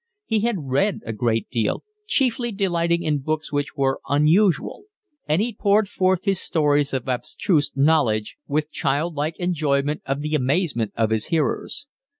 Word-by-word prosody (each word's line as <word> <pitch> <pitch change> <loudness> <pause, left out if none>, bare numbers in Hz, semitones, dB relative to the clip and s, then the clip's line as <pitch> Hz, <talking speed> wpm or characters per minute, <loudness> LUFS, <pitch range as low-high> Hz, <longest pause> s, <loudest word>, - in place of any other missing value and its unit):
He 220 -1 +1
had 215 -6 -1
read 190 +11 +1
a 115 - -3
great 115 +1 0
deal, 115 -4 -1 0.2
chiefly 240 - +1
delighting 170 -4 0
in 150 -3 0
books 155 +3 -3
which 145 0 -2
were 135 -1 +1
unusual; 165 - +2 0.4
and 155 +7 +2
he 235 0 -3
poured 205 0 +2
forth 185 0 +1
his 195 -3 +1
stores 145 -3 +1
of 130 -1 -3
abstruse 145 +5 0
knowledge 135 -8 +2
with 150 +2 -1
child 145 +5 -1
like 150 +2 -2
enjoyment 150 -4 0
of 135 +1 -1
the 150 +1 -3
amazement 135 - 0
of 110 -1 +1
his 110 -1 0
hearers. 160 - -1
150 Hz, 155 wpm, -23 LUFS, 135-185 Hz, 0.4 s, unusual